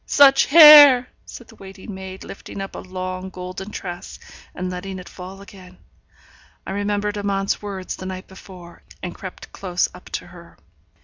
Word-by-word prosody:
Such 275 -1 +5
hair!' 290 -5 +9 0.2
said 240 - -11
the - - -16
waiting 195 +1 -11
maid, 190 0 -9
lifting 195 - -10
up 195 0 -6
a - - -7
long 185 0 -6
golden 185 +2 -8
tress, 175 -4 -8 0.4
and 185 - -4
letting 190 +1 -6
it 180 - -10
fall 190 +1 -11
again. 185 -2 -15 0.9
I - - -6
remembered 205 +1 -2
Amante's 195 -1 -2
words 195 -3 -6
the 185 - -7
night 185 0 -7
before, 180 -2 -14 0.2
and 180 - -5
crept 190 -3 -10
close 180 -2 -2
up 180 - -14
to - - -4
her. 170 -1 -16
190 Hz, 165 wpm, -21 LUFS, 185-205 Hz, 0.9 s, hair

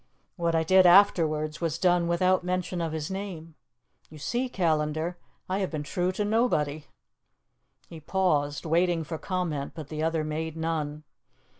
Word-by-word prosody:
What 170 -2 0
I 160 - +2
did 185 +2 +6
afterwards 160 -5 +4
was 165 -2 -1
done 175 -1 +2
without 185 +2 +2
mention 180 -1 -2
of 165 -1 -2
his 155 +1 -4
name. 185 -5 -6 0.6
You 155 - -12
see, 245 - -2
Callandar, 160 -2 -1 0.3
I 190 +1 -1
have 190 - -1
been 155 -2 -4
true 180 +5 -1
to 205 +2 -1
nobody." 155 -10 0 1.0
He 165 - -10
paused, 150 -4 0
waiting 170 +1 +2
for 160 0 -6
comment, 170 -7 -3
but 155 -3 -8
the 155 0 -4
other 160 0 0
made 160 +1 -4
none. 155 -2 -3
165 Hz, 155 wpm, -27 LUFS, 155-185 Hz, 1.0 s, did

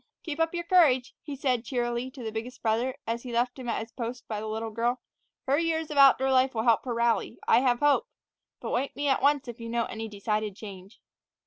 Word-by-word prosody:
"Keep 315 -2 -5
up 325 +1 +1
your 345 - -2
courage," 300 -9 +4
he 290 -2 -6
said 255 -4 0
cheerily 240 0 -2
to 260 -2 -10
the 220 - -4
biggest 225 +3 -6
brother, 235 +3 +1
as 230 +1 -2
he 250 - -7
left 245 +2 0
him 245 -2 -5
at - - -1
his 225 - -14
post 240 0 -6
by 215 -2 -3
the 220 - -5
little 220 +1 -3
girl; 240 +3 0 0.5
"her 275 +2 +2
years 320 -2 -1
of 295 - -4
outdoor 270 -1 +6
life 260 0 +3
will 220 - 0
help 230 -2 +3
her 245 - -2
rally. 235 0 +1
I 230 - +6
have 245 -1 +1
hope; 290 -1 +3 0.5
but - - -5
wake 265 +3 -1
me 290 - -2
at 270 - +2
once 285 -1 +2
if 240 0 -8
you 230 0 -6
note 235 0 -1
any 225 0 -5
decided 210 0 -2
change." 195 -1 -11
245 Hz, 235 wpm, -28 LUFS, 225-270 Hz, 0.5 s, outdoor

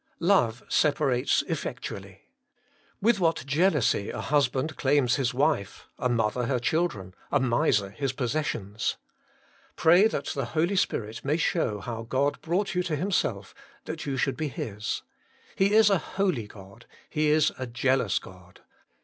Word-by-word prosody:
1. 170 - -3
Love 120 - +3
separates 140 -4 +2
effectually. - - -6 0.8
With 225 -1 +4
what 165 -8 +1
jealousy 145 - +2
a - - -5
husband 140 0 0
claims 135 -2 +2
his 135 -3 0
wife, 135 -6 0
a 125 - 0
mother 115 0 0
her 130 -1 +1
children, 120 - -1 0.2
a - - +3
miser 120 -5 +1
his 135 +3 -2
possessions! 125 -6 -2 0.8
Pray 175 +6 +5
that 145 - -3
the 135 -3 -2
Holy 170 +5 +2
Spirit 115 - -1
may 145 +3 +1
show 165 -10 0
how 115 +1 -5
God 135 +5 -1
brought 185 +5 -1
you 180 - +1
to 175 -4 -2
Himself, 185 +5 -1 0.3
that 160 -2 -6
you 135 -1 -2
should 135 +1 0
be 155 - -1
His, 105 -5 -4 0.5
'He 195 +1 +2
is 220 -2 +6
a 195 - +3
holy 180 - -1
God; 100 +2 -14 0.2
He 155 -1 0
is 155 0 +4
a 130 - -3
Jealous 120 -3 +1
God.' 90 -1 -11
135 Hz, 150 wpm, -27 LUFS, 115-160 Hz, 0.8 s, is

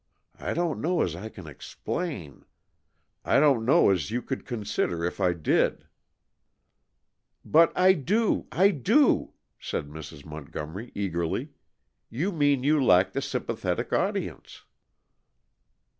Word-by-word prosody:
I - - -3
don't 170 -1 -1
know 170 +1 +1
as 85 - -2
I 100 +6 -7
can 95 -5 -12
explain; 80 - -6 0.8
I - - +3
don't 140 -6 +4
know 135 -1 +5
as 90 -3 -1
you 120 +3 -2
could 135 -1 -6
understand 105 -6 -1
if 85 - -3
I 90 - +3
did 85 -3 0 0.8
" - - -51 0.7
"But 165 +1 +5
I 185 +1 +6
do, 200 - 0
I 195 +3 +4
do," 220 - +2 0.3
said 75 - -4
Mrs. 75 -1 -10
Montgomery 80 +7 -7
eagerly. 85 -5 -2 0.6
"You 160 - -2
mean 145 -6 +2
you 145 0 +3
lack 95 -4 +4
the - - -1
sympathetic - - -3
audience." - - -2
120 Hz, 130 wpm, -27 LUFS, -, 0.8 s, I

